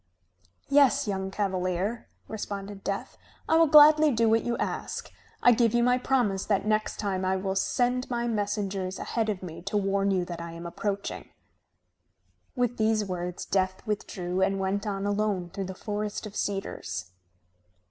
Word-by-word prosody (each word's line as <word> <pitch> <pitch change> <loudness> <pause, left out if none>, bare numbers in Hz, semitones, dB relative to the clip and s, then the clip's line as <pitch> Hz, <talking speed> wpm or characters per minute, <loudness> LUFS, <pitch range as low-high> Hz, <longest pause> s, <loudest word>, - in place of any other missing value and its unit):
"Yes, 280 -6 +4
young 190 -1 -2
cavalier," 190 +2 -2 0.2
responded 200 -2 -6
Death. 200 0 -4 0.3
"I 320 - +3
will 330 0 +6
gladly 305 +1 +8
do 230 -4 +2
what 225 0 +4
you 240 0 -1
ask. - - -4 0.3
I 245 - +8
give 235 -1 +3
you 240 - +4
my 250 +1 +3
promise 240 -7 +1
that 200 -2 0
next 215 0 0
time 190 -3 -2
I 185 0 +1
will 190 0 -2
send 245 +5 0
my 240 -1 -1
messengers 200 -3 -2
ahead 225 -2 -1
of 195 -3 -3
me 165 -2 -7
to 195 +3 -2
warn 195 0 +1
you 185 -2 +1
that 170 -1 -6
I 170 0 -7
am 170 +1 -8
approaching." 200 +3 -4 1.3
With 245 -2 0
these 220 -1 +2
words 180 -1 -4
Death 190 +1 -1
withdrew 190 -4 -3
and 195 0 +2
went 195 +2 -1
on 195 -1 -2
alone 205 -4 -1
through 195 +1 -4
the 190 0 -6
forest 210 +2 -4
of 210 -1 -9
cedars. 100 - -3
200 Hz, 165 wpm, -27 LUFS, 190-225 Hz, 1.3 s, gladly